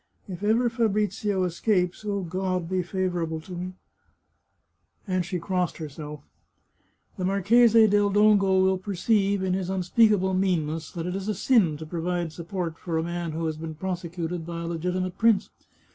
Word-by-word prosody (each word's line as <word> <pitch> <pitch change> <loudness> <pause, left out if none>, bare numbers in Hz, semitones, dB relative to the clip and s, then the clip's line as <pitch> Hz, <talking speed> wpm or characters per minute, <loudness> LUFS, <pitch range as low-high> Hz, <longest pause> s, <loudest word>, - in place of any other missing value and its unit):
If 185 -2 -7
ever 225 +4 +2
Fabrizio 210 -4 0
escapes 180 +1 0
(O 200 -1 -2
God! 185 0 -2
be 185 +1 0
favourable 175 -3 -2
to 185 - -13
me! 180 +1 -5 0.7
" - - -44
and 185 -1 0
she 180 +2 -3
crossed 180 0 -1
herself), 150 -1 -7 0.5
" - - -41
the 185 - -3
Marchese 220 +4 +5
del 205 -1 +3
Dongo 200 -2 +4
will 190 0 +2
perceive, 200 +1 +1
in 185 -1 0
his 185 -1 -2
unspeakable 190 +1 +3
meanness, 165 -4 0
that 170 -3 -4
it 180 +1 -3
is 195 +1 -4
a 215 - 0
sin 190 - +3
to 160 - -7
provide 175 +1 -2
support 170 -1 -4
for 165 -2 -3
a 160 - 0
man 170 -1 -3
who 165 +1 -2
has 155 -1 -2
been 160 0 -6
prosecuted 175 -1 -4
by 170 0 -5
a - - -4
legitimate 180 +2 -2
prince. 220 -3 +3
185 Hz, 170 wpm, -26 LUFS, 170-200 Hz, 0.7 s, Marchese